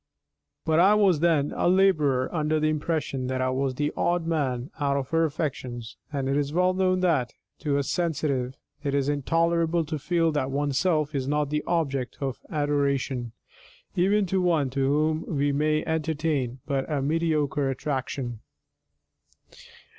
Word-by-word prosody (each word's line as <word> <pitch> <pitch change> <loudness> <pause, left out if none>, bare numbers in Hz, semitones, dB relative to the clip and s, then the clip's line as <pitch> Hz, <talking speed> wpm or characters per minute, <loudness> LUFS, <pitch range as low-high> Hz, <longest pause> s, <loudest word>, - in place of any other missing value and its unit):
But 160 0 +3
I 195 +4 +6
was 195 -7 +4
then 155 -3 +2
a - - +1
labourer 155 -9 +3
under 155 -1 +1
the 155 0 +2
impression 150 -4 -2
that 130 0 -2
I 130 0 +1
was 130 0 -1
the 145 +2 -1
odd 175 -1 0
man 140 -5 -1
out 140 -1 +1
of 135 -1 -3
her 165 0 +3
affections, 130 -6 -4 0.2
and 140 -2 -2
it 135 - +1
is 145 0 0
well 180 +3 +2
known 185 0 +1
that, 150 -10 +1 0.2
to 145 -3 0
a 140 - +1
sensitive, 145 -6 -1 0.3
it 140 -1 -1
is 140 -1 +1
intolerable 165 +3 +1
to 155 0 -4
feel 165 +2 +1
that 145 -3 -1
oneself 145 +3 0
is 135 -2 -2
not 150 0 0
the 150 0 0
object 140 -7 -1
of 135 -2 -3
adoration, 140 - -1 0.6
even 195 +3 +3
to 190 +1 0
one 160 -7 +1
to 135 0 0
whom 155 +3 +1
we 145 +1 +2
may 155 +2 +1
entertain 155 -5 -1
but 140 +1 -2
a 145 - +1
mediocre 150 -2 +1
attraction. 130 -3 -3
150 Hz, 160 wpm, -26 LUFS, 135-165 Hz, 0.6 s, I